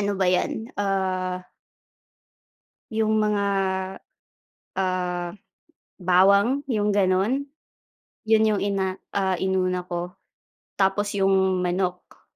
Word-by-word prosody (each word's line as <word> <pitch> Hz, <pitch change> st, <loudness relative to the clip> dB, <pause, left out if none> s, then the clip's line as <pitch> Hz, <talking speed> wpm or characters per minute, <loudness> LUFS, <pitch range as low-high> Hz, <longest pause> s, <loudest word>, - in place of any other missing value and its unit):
ano 200 Hz, -1 st, -1 dB
ba 190 Hz, -, +1 dB
yan, 180 Hz, +4 st, +1 dB, 0.2 s
ah 185 Hz, -2 st, -1 dB, 1.5 s
'Yung 220 Hz, -1 st, +2 dB
mga, 210 Hz, -1 st, +1 dB, 1.3 s
ah, 180 Hz, -2 st, -1 dB, 0.7 s
bawang 200 Hz, +8 st, +4 dB
'yung 210 Hz, -3 st, +1 dB
ganun. 200 Hz, +8 st, +1 dB, 0.8 s
'Yun 220 Hz, 0 st, +5 dB
'yung 205 Hz, -, 0 dB
ina 195 Hz, -1 st, -1 dB, 0.2 s
ah, 190 Hz, -2 st, +1 dB
inuna 185 Hz, -1 st, 0 dB
ko, 175 Hz, 0 st, -4 dB, 0.7 s
tapos 200 Hz, +1 st, +2 dB
'yung 190 Hz, -1 st, +3 dB
manok. 180 Hz, 0 st, -3 dB
190 Hz, 90 wpm, -24 LUFS, 185-205 Hz, 1.5 s, Yun